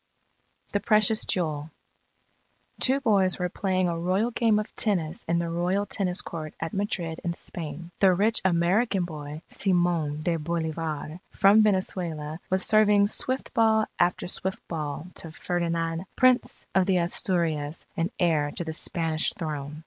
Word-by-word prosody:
THE 205 - +1
PRECIOUS 215 0 +3
JEWEL 155 -4 -1 1.1
Two 265 +1 +3
boys 195 -7 +3
were 180 -1 -1
playing 185 0 0
a 170 -1 -2
royal 190 +7 +1
game 225 -2 +2
of 210 - -4
tennis 175 -8 0
in 170 - +1
the 170 0 -1
royal 175 +4 0
tennis 190 -2 -1
court 155 -2 -7
at 160 0 -4
Madrid 175 -5 -2
in 170 - -1
Spain. 170 0 -7
The 195 -2 +6
rich 210 +5 +2
American 185 +3 +2
boy, 150 -1 -7
Simon 175 -5 +1
de 170 0 +1
Bolivar, 160 0 -3
from 200 +3 +5
Venezuela, 175 -6 -1
was 190 0 +2
serving 210 -2 +5
swift 260 +4 -2
ball 220 -1 +4
after 175 0 +1
swift 190 +1 -4
ball 150 -2 -4
to 165 - -5
Ferdinand, 165 0 -2
Prince 255 -1 +3
of 190 -1 +3
the 190 -2 +3
Asturias 170 -4 -1
and 165 +2 0
heir 160 -5 +2
to - - -2
the 160 -1 -4
Spanish 165 -1 0
throne. 150 -2 -5
175 Hz, 150 wpm, -26 LUFS, 160-195 Hz, 1.1 s, The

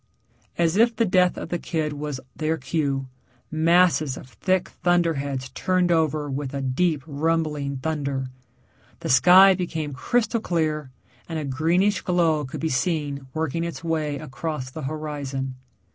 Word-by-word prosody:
As 170 +1 +2
if 230 +1 +4
the 230 +1 +2
death 180 -2 +3
of - - -6
the 175 - -2
kid 155 -3 -2
was 145 -2 -4 0.2
their 160 +1 -1
cue, 140 -2 -1 0.5
masses 160 -2 +3
of 125 - -11
thick 185 - 0
thunderheads 145 -7 +1
turned 185 +3 +1
over 155 -3 +1
with 140 0 -4
a 140 - -2
deep 140 +3 +1
rumbling 150 -2 -1
thunder. 140 -2 -2 0.8
The - - -4
sky 185 +9 +8
became 160 -5 -3
crystal 230 - 0
clear, 155 -6 -1 0.4
and 165 - -3
a 155 - -3
greenish 170 +9 +1
glow 165 -4 +2
could 130 - -7
be 160 - 0
seen 145 -1 -1
working 160 +1 -1
its 170 -3 -5
way 155 -3 -1
across 135 -1 -5
the 155 - -7
horizon. 140 -2 -4
155 Hz, 145 wpm, -24 LUFS, 140-170 Hz, 0.8 s, sky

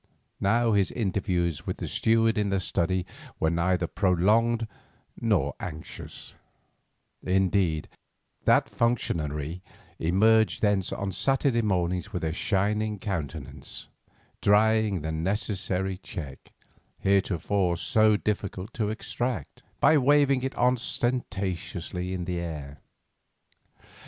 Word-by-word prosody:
Now 115 +4 +2
his 100 -3 +3
interviews 90 - -1
with - - -2
the - - -4
steward 115 0 +2
in 105 -1 0
the 95 0 +1
study 90 0 0 0.3
were 80 - +2
neither 85 +1 +1
prolonged 105 +7 +2 0.5
nor - - +1
anxious; 80 -2 -7 0.9
indeed, 95 -4 +1 0.6
that - - +4
functionary 85 -8 -1 0.4
emerged 110 +8 +3
thence 100 -3 +2
on 100 -1 -3
Saturday 135 +2 +2
mornings 90 -5 0
with - - -4
a 80 -1 -1
shining 105 +4 0
countenance, 95 -8 -6 0.5
drying 105 -2 +3
the 80 +1 -3
necessary 95 +2 -1
cheque, 75 -9 -8 0.5
heretofore 95 -2 +1
so 110 -1 +3
difficult 100 -2 -3
to 105 -3 -1
extract, 115 - -4 0.2
by 155 -2 +5
waving 140 -1 +4
it 130 +1 -3
ostentatiously 105 -7 -1
in 90 -2 -3
the 90 -1 -2
air. 75 -5 -6
95 Hz, 105 wpm, -27 LUFS, 90-110 Hz, 0.9 s, by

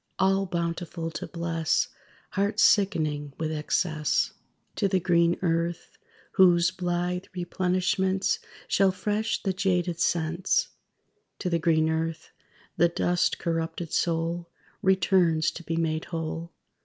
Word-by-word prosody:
All 195 +1 +2
bountiful 170 -1 -3
to 155 - -5
bless 165 -2 0 0.4
Hearts 200 +2 +1
sickening 155 -8 +2
with 160 -1 -2
excess. 155 0 0 0.4
To 200 - +2
the 190 -1 +2
green 170 -1 +3
earth, 170 0 -1 0.3
whose 175 -2 +5
blithe 180 0 -2
replenishments 185 - 0 0.3
Shall 195 -1 +3
fresh 210 +4 -1
the 190 - 0
jaded 180 -3 0
sense! 170 +2 +1 0.7
To 180 - -3
the 170 - +2
green 160 -1 +3
earth, 160 0 -2 0.5
the 170 - +5
dust 175 +1 +1
corrupted 165 0 -3
soul 170 0 0 0.3
Returns 175 -3 +3
to - - -9
be 165 0 -3
made 160 -1 -1
whole. 165 0 -4
170 Hz, 120 wpm, -27 LUFS, 165-185 Hz, 0.7 s, whose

